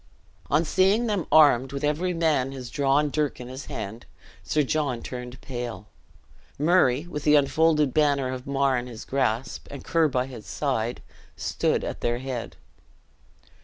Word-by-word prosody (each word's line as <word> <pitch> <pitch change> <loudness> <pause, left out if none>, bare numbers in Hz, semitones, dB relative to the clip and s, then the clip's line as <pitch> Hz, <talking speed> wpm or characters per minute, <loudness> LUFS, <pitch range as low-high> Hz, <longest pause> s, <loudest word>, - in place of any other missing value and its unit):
On 155 +4 +3
seeing 195 +8 +3
them 205 -7 -1
armed, 145 -4 +6
with 140 0 -5
every 155 +5 0
man 155 -6 +1
his 125 -3 -8
drawn 140 +1 +2
dirk 150 -1 -1
in 125 0 -8
his 130 +2 -8
hand, 110 +5 -6 0.3
Sir 150 - +1
John 140 -4 -1
turned 125 0 -7
pale. 120 -6 -6 0.7
Murray, 150 -3 +3
with 150 -4 -6
the 150 0 +5
unfolded 150 0 +3
banner 140 -4 +2
of 125 0 -7
Mar 135 -2 +2
in 120 - -7
his 115 -2 -9
grasp, 130 -2 -1
and 140 -2 -8
Ker 165 -1 +3
by 125 -3 0
his 125 -5 -10
side, 125 -5 -2 0.3
stood - - 0
at - - -5
their 120 0 0
head. 130 -2 -5
135 Hz, 160 wpm, -25 LUFS, 125-150 Hz, 0.7 s, armed